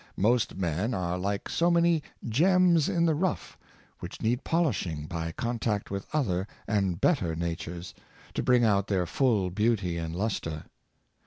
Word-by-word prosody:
Most 120 +4 +2
men 95 +6 -1
are 90 -1 -1
like 100 +2 -2
so 170 +1 +2
many 170 -2 +3 0.3
gems 170 - +4
in 170 -1 +2
the 160 - +3
rough, 175 +3 -2 0.4
which - - -8
need 120 +4 0
polishing 105 - 0
by 80 -1 -4
contact 115 0 -2
with 100 -1 -4
other 100 - 0 0.2
and 95 -5 0
better 90 - +2
natures, 85 +1 -4 0.4
to - - -1
bring 125 -1 +4
out 100 -2 +2
their 95 -4 +1
full 105 -2 +1
beauty 100 -4 0
and 80 0 -4
lustre. 85 -6 -2
105 Hz, 150 wpm, -28 LUFS, 90-135 Hz, 0.4 s, gems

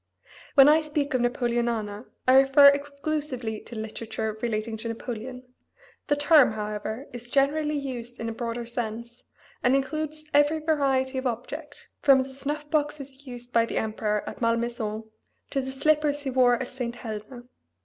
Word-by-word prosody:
When 275 -1 +9
I 310 +2 +6
speak 295 -2 -2
of 255 - +2
Napoleonana 235 -3 -1 0.2
I 255 - +6
refer 275 +1 +8
exclusively 280 -5 -2
to 240 - -11
literature 220 0 -4
relating 220 -1 -2
to 225 +2 -5
Napoleon; 240 +2 -6 0.6
the 290 - +3
term, 290 -4 +5
however, 215 +3 -4
is 240 0 -8
generally 295 +2 +2
used 245 -4 -5
in 230 - -3
a - - -2
broader 235 +1 -4
sense, 235 +1 -5 0.4
and 250 +2 +4
includes 310 +2 -2
every 290 +2 +4
variety 275 -4 +1
of 260 - -1
object, 290 +6 -6
from 275 -2 +6
the 260 - -5
snuff 290 +3 -4
boxes 290 -3 -2
used 245 0 -7
by 230 0 +4
the - - -3
emperor 215 -1 -1
at - - -7
Malmaison 230 -2 -1 0.5
to 275 - 0
the 265 - -5
slippers 290 +1 +1
he 270 - -2
wore 250 -1 +5
at 260 +1 -4
St. 245 -2 -4
Helena. 225 +2 -7
255 Hz, 160 wpm, -26 LUFS, 230-285 Hz, 0.6 s, When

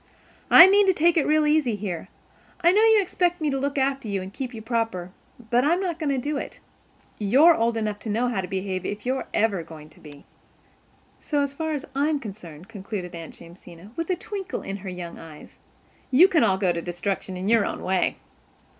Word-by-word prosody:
I 340 - +10
mean 400 +1 +4
to 380 - +5
take 340 0 +3
it 320 - +2
real 305 0 +3
easy 300 -7 +2
here. 190 -4 -5 0.5
I 345 0 +5
know 410 +3 +3
you 445 -1 +6
expect 355 -2 0
me 305 -2 -1
to 270 - -1
look 280 +1 -2
after 270 -2 0
you 200 -2 -2
and 190 +1 -8
keep 260 0 -5
you 230 - -8
proper, 225 -6 -3 0.4
but 245 +1 +3
I'm 335 +5 +2
not 350 -4 -3
going 310 -3 -1
to 275 - 0
do 290 +3 -2
it. - - -7 0.6
You're 265 +12 +5
old 230 -5 0
enough 210 -2 -2
to 220 - -7
know 230 +4 0
how 235 -6 -1
to 180 - -6
behave 190 0 -3
if 205 +2 -5
you're 260 +1 -2
ever 210 -4 +1
going 160 -1 -12
to - - -21
be. 145 -2 -14 0.9
So, 290 -2 -1
as 280 -1 -3
far 315 +2 -3
as 290 -1 -4
I 280 +2 +1
am 300 -2 0
concerned," 185 - -10
concluded 195 -4 -7
Aunt 165 -1 -9
Jamesina, 170 +2 -14
with 330 +1 -4
a 370 - +2
twinkle 385 0 -6
in 195 - -5
her 190 -1 -8
young 180 -2 -8
eyes, 160 -2 -13 0.5
"you 295 +8 +7
can 340 -5 +2
all 190 - +2
go 190 -2 +1
to 170 -1 -3
destruction 180 +2 -4
in 185 +2 -4
your 225 -1 +4
own - - -4
way." 185 -1 0
230 Hz, 220 wpm, -24 LUFS, 190-300 Hz, 0.9 s, I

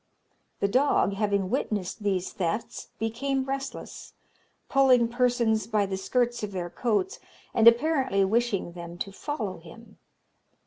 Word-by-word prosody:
The 200 - +3
dog, 255 -2 +2
having 200 -2 0
witnessed 215 -6 -2
these 190 -3 -1
thefts, 190 +5 -3
became 265 +5 -1
restless, 270 0 -6 0.5
pulling 260 -3 +4
persons 235 -3 +1
by 215 -3 +1
the 190 -1 -3
skirts 240 +5 0
of 210 -2 -4
their 175 -2 -4
coats, 250 - -1 0.3
and 230 -1 +5
apparently 260 -5 +4
wishing 220 -3 0
them 170 0 -9
to 195 - -4
follow 215 -4 -4
him. 205 +7 -15
220 Hz, 130 wpm, -27 LUFS, 195-250 Hz, 0.5 s, and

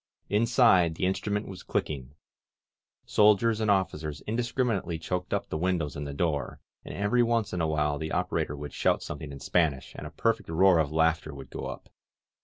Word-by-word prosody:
Inside, 105 -6 +4
the 90 - -1
instrument 105 +2 -1
was 95 -1 -8
clicking. 70 -2 -3 0.9
Soldiers 105 +2 +4
and 110 - +1
officers 80 -7 0
in 110 - -4
discriminately 120 -7 -1
choked 90 +2 -4
up - - -1
the 80 - -3
windows 85 -5 -1
and 75 0 -4
the - - -4
door, 75 -6 -1 0.2
and - - -8
every 100 +5 +2
once 115 -2 +1
in 90 - -1
a 80 - +1
while 75 -2 0
the 80 0 -4
operator 75 - -1
would 75 0 -7
shout - - +1
something 75 0 -6
in 70 - -8
Spanish 75 -6 0
and 75 - -7
a - - -8
perfect 110 +8 -1
roar 90 +1 +5
of 75 -2 0
laughter 80 -1 +1
would 70 -1 -10
go - - -5
up. - - -8
85 Hz, 190 wpm, -28 LUFS, 75-105 Hz, 0.9 s, roar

